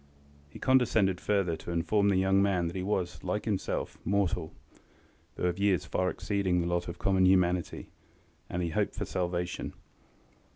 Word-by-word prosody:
He - - -11
condescended 110 -8 +2
further 100 -5 +1
to 80 - -9
inform 100 +5 +2
the 100 - +3
young 95 +1 +3
man 95 -3 +2
that 85 - -4
he 95 - -2
was, 90 -2 -2
like 95 +3 -2
himself, 105 -4 -2
mortal, 90 -4 0 0.8
though - - -6
of 90 +1 0
years 100 -3 +2
far 90 0 0
exceeding 95 -3 0
the 85 - 0
lot 85 0 -1
of 85 0 -6
common 95 0 +3
humanity, 90 -2 +1 0.6
and 90 - -2
that - - 0
he 85 - -3
hoped - - -1
for - - -3
salvation. 90 -1 -3
95 Hz, 170 wpm, -30 LUFS, 85-100 Hz, 0.8 s, the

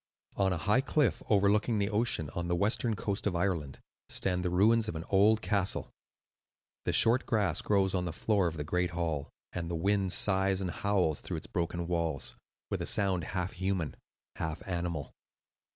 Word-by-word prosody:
On 95 -1 +2
a 90 - 0
high 105 +10 +2
cliff 145 -1 +1
overlooking 105 +2 +3
the 100 +1 0
ocean, 105 -9 +1
on 85 0 -3
the 85 - +1
western 110 +4 +1
coast 100 0 -2
of 95 - -1
Ireland, 85 -7 -1 0.3
stand 90 -1 -1
the 90 - -1
ruins 110 +5 +3
of 85 - -4
an 80 - -4
old 105 +3 +4
castle. 95 0 0 0.9
The - - +1
short 120 +3 +4
grass 100 -6 +1
grows 95 -2 +2
on 90 -1 0
the 85 - -2
floor 100 +2 +1
of 80 -1 -4
the 75 - -3
great 90 +3 0
hall, 80 -4 -2 0.2
and 85 -2 -4
the 85 - -2
wind 95 +2 +1
sighs 95 0 +3
and 95 -2 -2
howls 95 -8 0
through - - -4
its - - -5
broken 85 0 -2
walls, 85 -4 -2 0.4
with - - -1
a - - -2
sound 95 -5 +1
half 95 0 -3
human, 95 -8 -2 0.4
half 80 +2 -4
animal. 85 -5 -3
95 Hz, 185 wpm, -31 LUFS, 85-100 Hz, 0.9 s, old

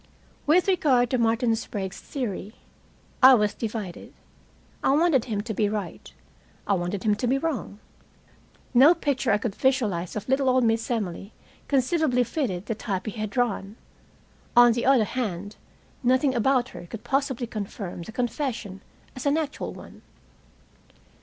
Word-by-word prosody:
With 345 +6 +4
regard 270 -10 +3
to 255 - +1
Martin 230 0 +2
Sprague's 195 -4 -5
theory, 215 -5 -5 0.7
I 260 0 +9
was 210 -2 +1
divided. 210 -6 -6 0.7
I 270 - +3
wanted 300 -5 +3
him 215 -5 -2
to 220 +1 -5
be 210 0 +1
right. 210 -1 -5 0.5
I 200 - +1
wanted 185 +1 -2
him 210 - +3
to 210 +4 -2
be 265 +3 +2
wrong. 270 -9 -3 1.0
No 280 +8 +7
picture 275 -6 0
I 200 - +4
could 210 -1 -3
visualize 215 -10 0
of 210 - -5
little 265 0 +2
old 255 0 +3
Miss 225 0 +1
Emily 205 -3 -3 0.3
conceivably 270 -1 +2
fitted 230 - -3
the 225 - -2
type 200 -3 -4
he 215 - -3
had 215 0 -4
drawn. 210 -3 -1 0.8
On 240 0 +8
the 235 +2 -1
other 265 -4 +5
hand, 205 -4 -4 0.5
nothing 260 +2 +2
about 255 +1 +2
her 175 - -10
could 220 +4 -8
possibly 270 -3 -1
confirm 200 -5 -6
the 170 - -8
confession 235 -5 -3 0.3
as 255 +2 -4
an 285 +2 +3
actual 305 -2 -3
one. - - -12
235 Hz, 155 wpm, -25 LUFS, 205-265 Hz, 1.0 s, I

